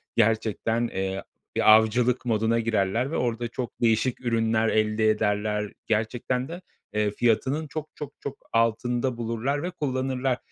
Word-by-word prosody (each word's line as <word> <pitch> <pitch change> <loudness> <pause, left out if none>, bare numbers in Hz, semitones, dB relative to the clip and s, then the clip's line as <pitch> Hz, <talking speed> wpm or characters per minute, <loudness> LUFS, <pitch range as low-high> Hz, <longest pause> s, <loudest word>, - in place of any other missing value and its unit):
gerçekten, 115 +1 +1
eee, 95 -1 -3 0.3
bir - - +6
avcılık 120 +3 +2
moduna 115 0 +2
girerler 115 +3 0
ve - - -1
orada 120 -1 -1
çok 120 0 -6
değişik 120 +2 +2
ürünler 115 -1 +2
elde 110 0 +2
ederler. 105 -1 0
Gerçekten 120 +4 -1
de, 175 +4 -7 0.3
eee, 105 -1 +1
fiyatının 120 +8 +1
çok, 155 0 -5
çok, 145 -2 -7
çok 140 - -6 0.2
altında 120 +2 +1
bulurlar 120 +5 -2
ve 180 - -2
kullanırlar. 130 -4 -1
115 Hz, 135 wpm, -26 LUFS, 110-130 Hz, 0.3 s, bir